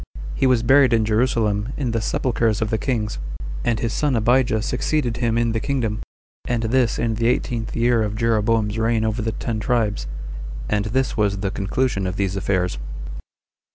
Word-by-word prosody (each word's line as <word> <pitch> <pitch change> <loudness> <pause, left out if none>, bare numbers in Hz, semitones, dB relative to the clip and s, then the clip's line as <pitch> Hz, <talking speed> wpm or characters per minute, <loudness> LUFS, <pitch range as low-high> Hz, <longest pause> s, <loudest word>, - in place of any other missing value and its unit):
He 135 - +2
was 125 -3 +3
buried 135 +1 +5
in 110 -1 +3
Jerusalem, 110 0 +1
in 130 -5 -1
the 115 -1 0
sepulchers 115 -2 0
of 110 -1 -1
the 110 - +1
kings; 110 -6 -1 0.4
and 115 -2 +1
his 115 -1 -1
son 145 -3 +1
Abijah 115 -1 +2
succeeded 125 -3 0
him 115 -2 +1
in 120 -1 +2
the 115 - 0
kingdom, 115 -4 -1 0.5
and 120 -2 -1
this 120 +1 +2
in 115 -1 0
the 115 +1 0
eighteenth 120 -2 -1
year 120 0 +3
of 105 -1 -1
Jeroboam's 110 -1 +1
reign 115 0 +1
over 110 +1 -1
the 110 0 -2
ten 115 -2 -3
tribes; 105 - 0 0.6
and 105 +9 0
this 130 +5 0
was 100 -2 +1
the 100 -2 -1
conclusion 100 0 -1
of 90 - -3
these 95 -1 -1
affairs. 90 -8 0
115 Hz, 180 wpm, -22 LUFS, 105-120 Hz, 0.6 s, buried